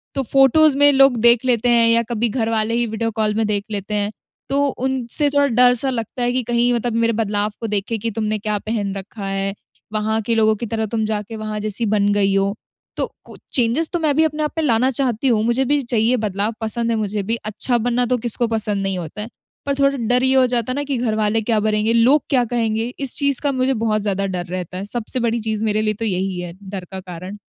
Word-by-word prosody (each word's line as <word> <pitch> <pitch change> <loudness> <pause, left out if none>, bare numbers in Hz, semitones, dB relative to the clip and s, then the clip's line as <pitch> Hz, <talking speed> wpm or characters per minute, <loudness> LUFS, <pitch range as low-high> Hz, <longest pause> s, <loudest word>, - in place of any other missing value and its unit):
तो 270 - +1
फोटोज़ 275 +2 +5
में 290 0 +6
लोग 270 -2 +5
देख 235 +1 +4
लेते 245 -1 +1
हैं 235 -1 +4
या 230 0 +3
कभी 235 0 0
घर 225 -1 -1
वाले 220 0 0
ही 240 +1 +1
वीडियो 225 +1 -2
कॉल 215 -1 0
में 220 0 +1
देख 205 -1 -1
लेते 205 0 -4
हैं। 205 0 0 0.4
तो 280 +1 +2
उनसे 265 +2 -1
थोड़ा 285 0 +2
डर 245 0 +5
सा 265 +3 +1
लगता 245 0 -4
है 240 - +1
कि 255 0 0
कहीं 240 +1 +1
मतलब 240 0 -1
मेरे 230 0 +2
बदलाव 210 -1 0
को 225 - -2
देखें 210 +2 -2
कि 230 +2 -2
तुमने 215 0 -2
क्या 210 0 -2
पहन 205 -2 -3
रखा 200 +1 -7
है? 195 0 -2 0.4
वहाँ 220 +1 0
के 230 +2 -1
लोगों 220 -1 +3
की 235 - -5
तरह 220 0 -2
तुम 220 0 -2
जाके 215 +1 -4
वहाँ 215 -1 -5
जैसी 215 +2 -1
बन 205 -1 +1
गयी 200 -1 +2
हो, 195 +1 +1 0.4
तो - - +1 0.2
कु - - -13 0.2
चेंजेस 255 +6 +3
तो 345 - 0
मैं 305 -3 +1
भी 315 - +4
अपने 305 -1 -1
आप 300 - -1
में 320 - 0
लाना 245 0 +2
चाहती 255 -1 0
हूँ, 220 -4 +2
मुझे 240 +3 +1
भी 290 +2 +1
चाहिए 235 0 +1
बदलाव 210 0 -1
पसंद 230 +1 0
है - - +1
मुझे 210 -1 -2
भी। 225 +4 -1
अच्छा 220 +3 +1
बनना 245 +1 0
तो 250 +1 0
किसको 240 0 +1
पसंद 215 -3 -1
नहीं 195 -1 -1
होता 170 +4 -6
है, 215 - -6 0.4
पर 280 0 -1
थोड़ा 275 0 +2
डर 245 +1 +1
ये 260 0 +3
हो 260 -1 +5
जाता 245 0 -1
है - - -2
ना 290 - -2
कि 280 -2 -2
घरवाले 220 -2 0
क्या 220 0 0
बनेंगे, 215 +1 +1
लोग 255 +5 +4
क्या 255 -4 +2
कहेंगे? 230 0 -1
इस 275 -3 -1
चीज़ 280 -3 +3
का 285 - 0
मुझे 260 0 0
बहुत 220 -2 0
ज़्यादा 200 -1 -1
डर 180 -2 -3
रहता 180 0 -6
है। 190 - -5
सबसे 240 +4 0
बड़ी 235 -1 0
चीज़ 220 -1 -3
मेरे 215 0 +1
लिए 215 0 0
तो 225 +2 -4
यही 190 -2 -2
है 175 -1 -6
डर 190 -2 -7
का 190 - -5
कारण। 185 +2 -8
225 Hz, 245 wpm, -20 LUFS, 210-250 Hz, 0.4 s, में